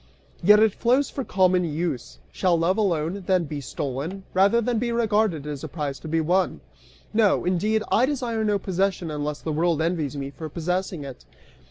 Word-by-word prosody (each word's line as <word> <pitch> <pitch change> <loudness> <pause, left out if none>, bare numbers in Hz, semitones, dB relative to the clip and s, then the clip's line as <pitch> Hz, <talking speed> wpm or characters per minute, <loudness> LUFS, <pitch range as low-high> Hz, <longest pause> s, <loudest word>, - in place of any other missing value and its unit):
"Yet 210 +4 +7
it 220 -2 +4
flows 255 +6 +2
for 270 - -3
common 185 -3 +2
use. 160 -5 -3
Shall 180 -3 +2
love 170 +3 +2
alone, 185 -2 0
then, 185 -2 +3
be 145 -2 -5
stolen, 140 +8 -4
rather 195 +5 +4
than 235 0 0
be 235 0 -1
regarded 215 -9 +1
as 145 -2 -5
a - - -3
prize 145 -2 -4
to - - -9
be 165 +1 +1
won? 180 +4 +1 0.5
No, 215 -2 +3
indeed 210 +5 +1
I 250 +4 +4
desire 240 -6 -1
no 210 -1 +2
possession 190 -3 -1
unless 150 0 -3
the 160 - -3
world 165 0 +1
envies 160 -4 -1
me 140 0 -4
for 155 +2 -7
possessing 180 0 -2
it. 135 -2 -9
180 Hz, 185 wpm, -24 LUFS, 155-210 Hz, 0.5 s, Yet